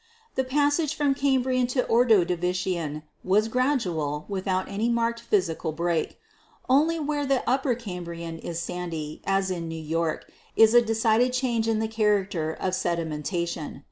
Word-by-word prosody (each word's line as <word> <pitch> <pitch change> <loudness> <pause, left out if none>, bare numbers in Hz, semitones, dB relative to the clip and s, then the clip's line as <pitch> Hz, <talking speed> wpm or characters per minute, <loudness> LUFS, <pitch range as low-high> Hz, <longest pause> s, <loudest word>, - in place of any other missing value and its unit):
"The 265 - 0
passage 290 +3 +1
from 290 -3 +2
Cambrian 260 -2 +1
to 250 0 0
Ordovician 180 -8 +1 0.2
was 210 +4 +3
gradual, 185 - 0
without 190 -1 -1
any 210 +4 -1
marked 235 0 0
physical 180 -8 -1
break. 170 0 -1 0.5
Only 310 +6 +3
where 295 -1 -1
the 275 -2 0
Upper 260 0 +2
Cambrian 170 -6 -6
is 170 0 -5
sandy, 165 -3 -5
as 195 -1 +1
in 170 -2 -3
New 165 - -5
York, 160 0 -2 0.3
is 220 -1 +7
there 240 +1 +7
a - - -2
decided 225 +2 +2
change 240 -3 0
in 225 -1 +2
the 220 0 0
character 200 -7 0
of 185 +3 -3
sedimentation. 170 -3 -2
205 Hz, 145 wpm, -26 LUFS, 170-250 Hz, 0.5 s, is